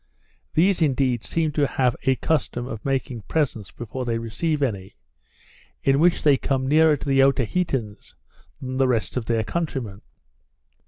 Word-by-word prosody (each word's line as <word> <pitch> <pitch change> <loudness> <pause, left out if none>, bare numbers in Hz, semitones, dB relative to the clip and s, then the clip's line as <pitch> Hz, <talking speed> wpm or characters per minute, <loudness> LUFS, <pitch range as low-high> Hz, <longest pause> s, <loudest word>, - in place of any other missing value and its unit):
These 180 +3 +3
indeed 130 -6 +1
seem 160 -2 -1
to 145 -1 +1
have 125 -2 +1
a 130 - +4
custom 130 -5 -1
of 115 -5 -7
making 135 -3 -2
presents 125 - -1
before 120 +2 -6
they 115 -2 -1
receive 145 +7 -2
any, 100 -6 -3 0.9
in 135 0 +3
which 175 +2 +3
they 145 -3 +5
come 130 -1 -1
nearer 155 +1 +4
to 140 - -8
the 135 -1 +2
Otaheiteans 135 - 0 0.4
than 130 0 -5
the 135 0 +3
rest 115 -3 -1
of 125 -3 -2
their 115 -1 0
countrymen. 125 - -4
135 Hz, 155 wpm, -23 LUFS, 120-150 Hz, 0.9 s, they